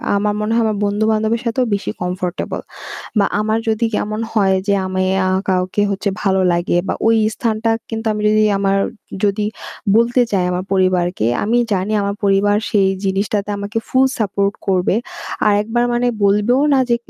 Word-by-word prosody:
আমার 210 Hz, +1 st, +1 dB
মনে 210 Hz, +1 st, -1 dB
হয় 230 Hz, -, +3 dB
আমার 215 Hz, -1 st, 0 dB
বন্ধু 205 Hz, +1 st, 0 dB
বান্ধবের 220 Hz, +1 st, 0 dB
সাথেও 245 Hz, +2 st, 0 dB
বেশি 200 Hz, -, -2 dB
comfortable. 180 Hz, 0 st, -3 dB, 0.6 s
বা 200 Hz, -, +4 dB, 0.2 s
আমার 220 Hz, +1 st, 0 dB
যদি 220 Hz, +1 st, +1 dB
কেমন 215 Hz, +1 st, -2 dB
হয় 195 Hz, -3 st, +3 dB
যে 200 Hz, -, +2 dB
আমি 185 Hz, 0 st, -1 dB, 0.2 s
আ -, -, +1 dB, 0.2 s
কাউকে 185 Hz, +2 st, 0 dB
হচ্ছে 200 Hz, +1 st, -2 dB
ভালো 190 Hz, -1 st, +2 dB
লাগে 175 Hz, 0 st, 0 dB
বা -, -, 0 dB
ওই 225 Hz, -, +5 dB, 0.2 s
স্থানটা 225 Hz, -1 st, -1 dB, 0.2 s
কিন্তু 225 Hz, 0 st, -5 dB
আমি 210 Hz, -, -4 dB
যদি 215 Hz, 0 st, +3 dB
আমার 195 Hz, 0 st, +1 dB, 0.5 s
যদি 205 Hz, +1 st, +1 dB, 0.5 s
বলতে 240 Hz, +2 st, +3 dB
চাই 185 Hz, -2 st, +2 dB
আমার 180 Hz, +1 st, -2 dB
পরিবারকে, 180 Hz, -, +1 dB, 0.2 s
আমি 230 Hz, +4 st, +2 dB
জানি 195 Hz, +2 st, -1 dB
আমার 200 Hz, 0 st, -1 dB
পরিবার 200 Hz, +1 st, +3 dB
সেই 195 Hz, -2 st, +3 dB, 0.2 s
জিনিসটাতে 200 Hz, +1 st, -1 dB
আমাকে 205 Hz, +3 st, -3 dB
full 260 Hz, +1 st, +3 dB
support 200 Hz, -1 st, 0 dB
করবে। 190 Hz, 0 st, +1 dB, 0.5 s
আরেকবার 220 Hz, +4 st, +1 dB
মানে 240 Hz, +1 st, +1 dB, 0.2 s
বলবেও 210 Hz, +6 st, +3 dB
না 275 Hz, -, +4 dB
যে 235 Hz, -, +3 dB
205 Hz, 170 wpm, -18 LUFS, 195-220 Hz, 0.6 s, ওই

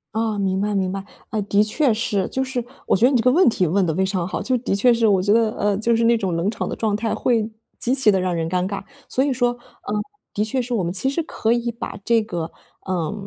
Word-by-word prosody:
哦， 220 Hz, -2 st, 0 dB
明 190 Hz, -1 st, 0 dB
白 205 Hz, 0 st, 0 dB
明 190 Hz, -1 st, 0 dB
白， 195 Hz, 0 st, -5 dB, 0.2 s
嗯， 215 Hz, -, -1 dB
的 205 Hz, 0 st, +3 dB
确 245 Hz, +4 st, +2 dB
是， 215 Hz, -3 st, 0 dB
就 265 Hz, -, -1 dB
是 260 Hz, -2 st, -3 dB, 0.2 s
我 -, -, +3 dB
觉 230 Hz, -, +4 dB
得 260 Hz, -, +5 dB
你 255 Hz, -, +4 dB
这 225 Hz, -, 0 dB
个 250 Hz, -, +5 dB
问 345 Hz, +4 st, +5 dB
题 190 Hz, -5 st, +2 dB
问 185 Hz, +3 st, +2 dB
得 160 Hz, -, -1 dB
非 190 Hz, +2 st, +2 dB
常 185 Hz, -3 st, -1 dB
好， -, -, -3 dB
就 255 Hz, -, 0 dB
是 -, -, +2 dB
的 195 Hz, -, 0 dB
确 240 Hz, +5 st, +4 dB
是 230 Hz, -1 st, +2 dB
我 195 Hz, -3 st, +3 dB
觉 200 Hz, +2 st, +1 dB
得， 225 Hz, 0 st, +3 dB
呃， 205 Hz, -1 st, +1 dB
就 230 Hz, +2 st, +2 dB
是 230 Hz, -, +1 dB
那 235 Hz, 0 st, +4 dB
种 190 Hz, -6 st, -1 dB
冷 175 Hz, +5 st, 0 dB
场 -, -, -4 dB
的 -, -, -3 dB
状 220 Hz, -2 st, -1 dB
态 220 Hz, +1 st, -1 dB
会 225 Hz, -3 st, +1 dB, 0.3 s
极 250 Hz, +2 st, +1 dB
其 260 Hz, -6 st, +5 dB
的 190 Hz, -, +2 dB
让 185 Hz, -1 st, -1 dB
人 165 Hz, 0 st, -2 dB
尴 180 Hz, 0 st, 0 dB
尬。 200 Hz, 0 st, -4 dB, 0.2 s
所 260 Hz, -, +1 dB
以 285 Hz, -, +1 dB
说， 245 Hz, -1 st, +2 dB
呃， 240 Hz, -3 st, -9 dB, 0.4 s
的 210 Hz, -, 0 dB
确 250 Hz, +4 st, 0 dB
是 245 Hz, 0 st, -4 dB
我 210 Hz, -, +1 dB
们 170 Hz, -, -1 dB
其 230 Hz, +8 st, 0 dB
实 325 Hz, +4 st, -1 dB
可 225 Hz, -7 st, 0 dB
以 235 Hz, 0 st, -1 dB
把 235 Hz, -2 st, -6 dB
这 230 Hz, +1 st, +3 dB
个， 170 Hz, -6 st, -4 dB, 0.3 s
呃， 175 Hz, -4 st, -2 dB
215 Hz, 305 characters per minute, -22 LUFS, 190-240 Hz, 0.4 s, 得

